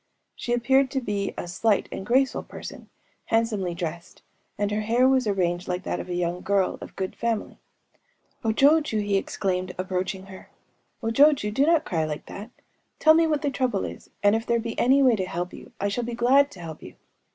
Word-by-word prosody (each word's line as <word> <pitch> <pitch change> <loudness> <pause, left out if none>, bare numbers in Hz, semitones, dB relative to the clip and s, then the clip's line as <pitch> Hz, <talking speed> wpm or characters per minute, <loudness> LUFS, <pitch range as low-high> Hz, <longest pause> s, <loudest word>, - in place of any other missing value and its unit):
She 240 - -5
appeared 265 +3 +3
to 265 - -1
be 205 -5 -2
a - - -4
slight 200 +4 +1
and - - -5
graceful 260 +5 +2
person, - - -10 0.4
handsomely 215 -6 0
dressed; 170 -1 -6 0.3
and 205 0 -1
her 210 +1 0
hair 235 +4 +3
was 260 -3 +3
arranged 180 -3 0
like 180 +1 -2
that - - -3
of - - -7
a 175 - -2
young 175 0 -1
girl 195 -2 0
of - - -10
good 190 -1 -4
family. 230 -2 -2 0.8
“O 225 - +1
jochŇę,‚ÄĚ 275 -2 +3
he 205 -1 +1
exclaimed, 185 -1 -2
approaching 185 +1 -3
her,‚ÄĒ‚ÄúO 210 +4 -9
jochŇę, 275 -6 +4
do 275 +6 +2
not 330 -2 +3
cry 165 -3 -1
like 150 -1 -4
that!... 210 +4 -8 0.5
Tell 315 - +6
me 325 0 +4
what 300 -2 0
the 285 - +1
trouble 250 -7 0
is; - - -9
and 205 +1 +5
if 225 - -1
there 235 0 +2
be 230 0 -4
any 270 +3 +4
way 250 -3 +5
to 190 -3 -2
help 180 0 -4
you, - - -12
I 200 - 0
shall 220 +4 -2
be 235 0 -4
glad 270 +4 +4
to 185 - -12
help 160 -2 -8
you. - - -11
210 Hz, 205 wpm, -25 LUFS, 185-255 Hz, 0.8 s, Tell